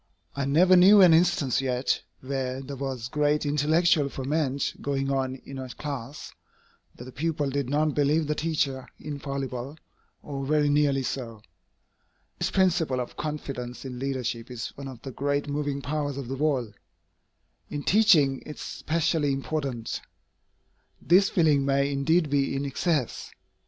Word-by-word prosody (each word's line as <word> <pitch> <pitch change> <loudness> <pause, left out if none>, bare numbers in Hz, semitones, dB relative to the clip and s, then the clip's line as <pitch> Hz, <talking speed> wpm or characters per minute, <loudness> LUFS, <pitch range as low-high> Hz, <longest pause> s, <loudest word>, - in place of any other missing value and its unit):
I 140 -1 -1
never 175 +7 +5
knew 195 +3 +8
an 180 -3 +8
instance 160 -6 +3
yet, 130 0 0 0.2
where 130 -1 -3
there 135 +1 -7
was 130 -3 -4
great 150 +2 +1
intellectual 150 +1 +2
ferment 140 0 -1
going 135 -1 -1
on 130 -1 -1
in 135 -1 -7
a 130 -1 -6
class, 140 0 -6 0.6
that - - -10
the 130 - -10
pupils 145 0 -2
did 140 -3 -1
not 150 +1 +1
believe 150 +3 +2
the 150 - 0
teacher 150 -5 -1
infallible, 140 -2 -5 0.5
or 140 -2 -5
very 150 +1 +2
nearly 145 -2 +2
so. 115 -5 -5 1.0
This - - 0
principle 170 -8 +2
of 125 - -5
confidence 135 -5 -5
in 125 -2 -6
leadership 130 -3 -3
is 120 -3 -5
one 140 0 -9
of 130 -3 -9
the 135 - -6
great 145 +3 -1
moving 145 -1 -2
powers 145 -2 -2
of 135 -3 -6
the 135 - -2
world. 135 -6 0 1.0
In 145 -1 -4
teaching, 170 -11 +4
it 150 - -8
is - - -10
specially 160 -2 0
important. 135 -4 -3 1.0
This 190 +4 +4
feeling 155 -5 +3
may 140 +1 +1
indeed 155 +4 +2
be 140 -1 +1
in 140 +1 -2
excess. 140 -1 -1
140 Hz, 150 wpm, -26 LUFS, 135-150 Hz, 1.0 s, knew